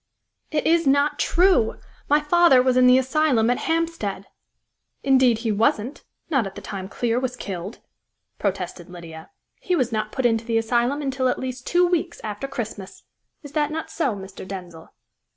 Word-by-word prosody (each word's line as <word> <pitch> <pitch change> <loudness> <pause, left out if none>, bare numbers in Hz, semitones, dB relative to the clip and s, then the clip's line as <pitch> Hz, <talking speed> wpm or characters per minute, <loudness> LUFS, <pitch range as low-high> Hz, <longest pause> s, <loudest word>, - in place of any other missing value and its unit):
"It 305 -1 -1
is 330 -1 +3
not 285 +2 +2
true! 355 - +3 0.3
My 295 +1 +5
father 315 -2 +5
was 255 -1 +2
in 255 0 +5
the 250 +1 +7
asylum 260 -3 +2
at 250 - 0
Hampstead!" 325 - -1 0.8
"Indeed 260 -4 +4
he 225 - +2
wasn't 220 +4 0 0.2
not 270 -10 +1
at 195 - -10
the - - -6
time 190 -2 -6
Clear 235 +1 -1
was 255 -1 -3
killed!" 195 -2 -6 0.6
protested 185 -3 -3
Lydia. 170 -2 -10 0.3
"He 365 - 0
was 255 -7 0
not 215 -1 -2
put 260 - -2
into 225 -1 +2
the 230 0 0
asylum 240 +5 0
until 265 -1 0
at 250 - 0
least 255 -1 -6
two 355 +1 +4
weeks 345 -1 -1
after 210 +4 -4
Christmas. 220 -7 -7 0.4
Is 290 - -10
that 295 -1 0
not 320 +1 -5
so, 275 -10 -1
Mr. 190 -1 -9
Denzil?" 180 -4 -9
250 Hz, 170 wpm, -23 LUFS, 210-295 Hz, 0.8 s, the